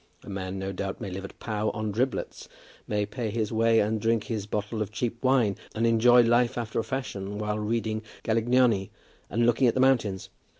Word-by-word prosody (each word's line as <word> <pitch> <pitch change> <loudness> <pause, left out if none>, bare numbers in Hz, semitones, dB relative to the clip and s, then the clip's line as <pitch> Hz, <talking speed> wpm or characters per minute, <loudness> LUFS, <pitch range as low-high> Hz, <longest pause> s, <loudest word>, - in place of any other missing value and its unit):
A - - -11
man, 95 0 -4
no 95 0 -3
doubt, 95 +1 -4
may 100 -5 -5
live 95 +2 -5
at - - -11
Pau 110 -1 -2
on 110 0 -2
driblets; 125 +6 -2 0.4
may 105 -1 0
pay 110 +2 -4
his 110 -1 -2
way 115 0 +4
and 110 +1 0
drink 115 -1 +1
his 110 -3 -4
bottle 105 +1 -3
of 105 - -3
cheap 115 +1 -3
wine, 125 -6 +3 0.2
and 115 +1 +1
enjoy 120 +2 +6
life 120 +2 +2
after 115 -2 -2
a - - 0
fashion 105 -7 -4
while 105 0 -2
reading 110 0 -1 0.2
Galignani 115 -2 +2 0.4
and 115 +2 +1
looking 120 +2 +4
at 115 - +2
the - - +1
mountains. 120 -8 +2
110 Hz, 200 wpm, -27 LUFS, 105-120 Hz, 0.4 s, enjoy